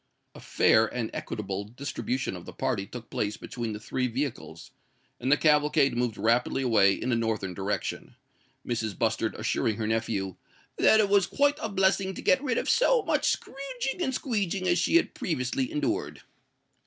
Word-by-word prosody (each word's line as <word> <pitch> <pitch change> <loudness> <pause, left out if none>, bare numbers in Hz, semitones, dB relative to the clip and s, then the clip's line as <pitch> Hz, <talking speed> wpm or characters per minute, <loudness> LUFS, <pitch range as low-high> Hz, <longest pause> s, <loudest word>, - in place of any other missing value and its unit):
A - - -12
fair 110 0 +3
and 115 0 -4
equitable 100 -2 -4
distribution 125 0 -4
of 90 - -9
the - - -8
party 100 0 -2
took 120 -2 -10
place 105 0 -2
between 115 -3 -5
the 105 - -6
three 125 +4 -2
vehicles; 130 +2 -5 0.5
and 130 - -1
the 145 - +6
cavalcade 150 -3 +3
moved 120 -2 -1
rapidly 120 +4 +1
away 100 -6 +4
in 130 - -3
a - - +3
northern 110 -5 -1
direction, 100 +2 -4 0.5
Mrs. 110 -4 -2
Bustard - - 0
assuring 110 - 0
her 110 - -3
nephew 110 -4 -2 0.4
"that 220 - +6
it 210 - +4
was 200 -2 +3
quite 285 +4 +2
a 220 - -2
blessing 190 -1 +1
to - - -6
get 270 - +4
rid 255 -5 0
of - - -1
so - - +3
much - - +1
scrooging 270 +2 -4
and 305 - +1
squeeging 200 -8 -2
as 175 -1 +3
she 175 - +1
had 340 - +3
previously 130 -5 -2
endured." 150 - -2
125 Hz, 175 wpm, -27 LUFS, -, 0.5 s, the